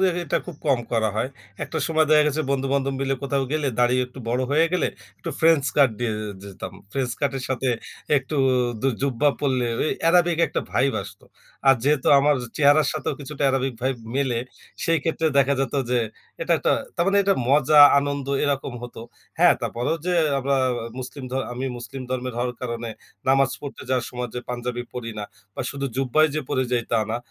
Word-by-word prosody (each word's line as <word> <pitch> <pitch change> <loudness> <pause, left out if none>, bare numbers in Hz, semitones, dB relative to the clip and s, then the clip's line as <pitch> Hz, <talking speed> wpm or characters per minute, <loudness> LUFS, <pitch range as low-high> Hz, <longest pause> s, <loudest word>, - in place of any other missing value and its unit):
যে 190 - +4 0.2
এটা 150 - 0
খুব 175 -4 -8
কম 135 -4 +3
করা 110 -2 +2
হয়। 120 - 0 0.4
একটা 160 - -4
সময় 160 -1 +3
দেখা 155 -1 +7
গেছে 150 +1 0
বন্ধু-বান্ধব 135 0 0
মিলে 135 0 0
কোথাও 140 0 0
গেলে, 155 -2 0
দাঁড়ি 120 0 +4
একটু 125 +1 -14
বড় 125 +2 +1
হয়ে 155 +3 +4
গেলে, 180 - +2 0.3
একটু - - -5
ফ্রেঞ্চ 160 -4 +5
কাট 140 -3 +6
দিয়ে 120 -2 -1
এ - - -4 0.2
যেতাম। 100 -1 -8 0.2
ফ্রেঞ্চ 130 -3 -1
কাটের 135 -2 -1
সাথে 130 0 -1 0.5
একটু 140 +3 -2 0.5
দু 135 - +3
জুব্বা 140 +1 +2
পরলে 130 -4 +1
ওই 155 - +1
অ্যারাবিক 170 0 +4
একটা - - -2
ভাইব 135 +1 +2
আসতো। - - -12 0.4
আর, 135 - +8
যেহেতু 145 0 +2
আমার 145 +1 +4 0.2
চেহারার 145 0 +5
সাথেও - - -2
কিছুটা 145 +1 -6
অ্যারাবিক 135 -1 +1
ভাইব 130 0 0 0.2
মিলে, 130 -4 +1 0.5
সেই 165 0 +3
ক্ষেত্রে 165 0 0
দেখা 140 +1 +4
যেত 135 - -1 0.2
যে, 125 - +3 0.4
এটা - - +1
একটা - - +2 0.2
তার 170 - +2
মানে 200 +1 +3
এটা 195 0 +3
মজা, 150 +2 +5 0.2
আনন্দ, 140 -1 -2 0.2
এরকম 140 -2 -1
হতো। 120 -2 -8 0.4
হ্যাঁ, - - +7
তারপরেও 120 +7 -1
যে 180 - +1 0.2
আমরা 135 +1 +1
আ - - 0 0.3
মুসলিম 130 +2 -7
ধ - - -11 0.2
আমি 125 +2 -4
মুসলিম 130 +3 -7
ধর্মের 130 -1 -3
হওয়ার 125 0 -1
কারণে 120 -1 -4 0.4
নামাজ 135 0 +4
পড়তে 145 - -8
যাওয়ার 130 -2 0
সময় 125 0 -4
যে 125 - -3
পাঞ্জাবি 120 0 -3
পরি 120 -2 -4
না 105 - -3 0.3
বা - - -4
শুধু 140 0 -3
জুব্বাই 135 +4 +3
যে 155 - 0
পরে 130 - +1
যাই, 120 -1 +2
তা 115 - +4
না। 115 - 0
135 Hz, 195 wpm, -24 LUFS, 125-150 Hz, 0.5 s, আর